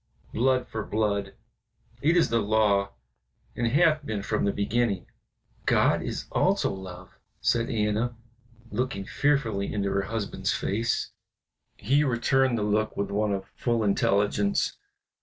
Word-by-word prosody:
Blood 130 +1 +2
for 110 - -4
blood, 100 -2 -1 0.7
it 165 +5 +3
is 170 - +4
the 115 - +2
law, 105 -2 +2 0.6
and 120 - 0
hath 155 +4 +3
been 110 -6 -3
from 110 -1 0
the 100 - +2
beginning." 100 -1 0 0.6
"God - - +3
is - - -4
also - - +2
love," 95 -2 -10 0.2
said 115 0 +1
Anna, 110 +1 0 0.5
looking 105 -3 -2
fearfully 115 -8 0
into 100 -2 -1
her 100 - +1
husband's 110 -3 -2
face. 115 +3 -1 0.7
He 140 +8 +2
returned 130 -1 +2
the 105 - -1
look 105 +1 0
with 100 0 -2
one 105 +1 0
of 95 -1 -2
full 120 -2 0
intelligence. 100 0 +1
110 Hz, 135 wpm, -27 LUFS, 100-120 Hz, 0.7 s, is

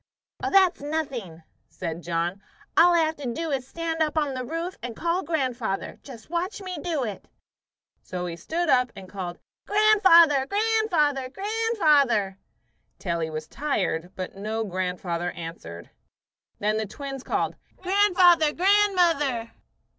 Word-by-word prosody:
"Oh, - - 0
that's 380 -5 +4
nothing," 270 - -4 0.3
said 170 -2 -5
John. 175 +3 -2 0.3
"All 345 +1 +6
I'll 330 -2 +4
have 315 0 -3
to 270 -4 -4
do 325 +6 -3
is 265 -2 -1
to - - -23
stand 325 +1 -3
up 310 0 0
on 295 -3 +1
the 255 -1 -4
roof 330 +7 -4
and 235 -1 -6
call 340 +6 0
grandfather. 255 - -2
Just 240 -6 -12
watch 350 +5 -3
me 370 -2 -6
do 320 -6 -1
it." 210 -5 -6 0.7
So 180 -1 -5
he 170 -1 -4
stood 330 - -2
up 250 -3 +3
and 195 -2 -10
called, 185 -2 -6 0.3
"Grandfather! 375 -10 +5
Grandfather! 375 -11 +1
Grandfather!" 305 - +1 0.6
till 175 -3 -2
he 160 -1 -2
was 155 0 -6
tired; 185 - -2
but 185 0 -6
no 215 +3 -3
grandfather 180 -2 -3
answered. 125 - -9 0.7
Then 215 +1 0
the 220 -1 -2
twins 270 +4 -7
called, - - -1 0.3
"Grandfather! 365 -5 +4
Grandmother!" 350 - +2
275 Hz, 145 wpm, -25 LUFS, -, 0.7 s, All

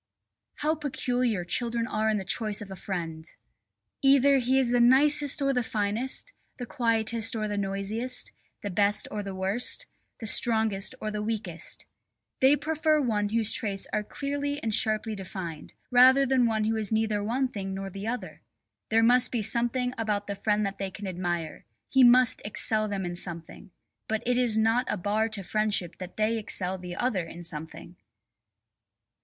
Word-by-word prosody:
How 305 +1 +1
peculiar 250 - -1
children 235 +4 -1
are 220 -2 -1
in 215 - +1
their 195 - -5
choice 210 +2 0
of 205 -2 -8
a - - -6
friend! 165 -4 -5 0.8
Either 275 0 +5
he 255 +2 +2
is 255 -3 +3
the 245 - +3
nicest 280 +3 +5
or 275 0 +2
the 250 - +1
finest, 225 - -2 0.2
the 245 - -5
quietest 230 -3 0
or 215 -1 -2
the 205 - -3
noisiest, 200 +5 -3 0.3
the 205 - -3
best 205 +3 +2
or 210 - -3
the 195 -1 -6
worst, 200 - +2 0.3
the 225 - -6
strongest 220 -1 +1
or 215 - -4
the 210 0 -3
weakest. 220 +1 -4 0.5
They 265 +2 +6
prefer 310 +1 +1
one 210 -6 0
whose 225 0 +2
traits 200 -3 -2
are 210 - 0
clearly 285 +4 -3
and 220 - 0
sharply 215 +1 0
defined, 185 -5 -7 0.2
rather 260 +2 +6
than 255 -2 +3
one 220 -1 0
who 220 +1 0
is 215 -2 -1
neither 220 -2 0
one 255 +5 0
thing 195 -5 -5
nor 195 0 -5
the 195 +3 -6
other. 245 +2 -5 0.5
There 225 0 +3
must 245 +2 +4
be 235 -3 -1
something 240 +3 0
about 210 -2 -1
the 200 - -4
friend 210 +1 0
that 195 0 -5
they 195 -1 -2
can 190 +3 -9
admire; 175 -3 -4 0.3
he 265 -1 +5
must 250 0 +5
excel 215 +1 0
them 200 -2 -3
in 175 0 -4
something. 170 0 -5 0.4
But 220 +1 -2
it 250 +1 +1
is 235 -3 +4
not 225 +3 +2
a - - -1
bar 210 +4 0
to 210 -3 -2
friendship 210 -3 -1
that 185 -1 -9
they 220 +1 +1
excel 190 -3 -2
the 180 -1 -7
other 195 -8 -1
in 170 +1 -10
something. 165 +2 -7
220 Hz, 175 wpm, -27 LUFS, 200-245 Hz, 0.8 s, They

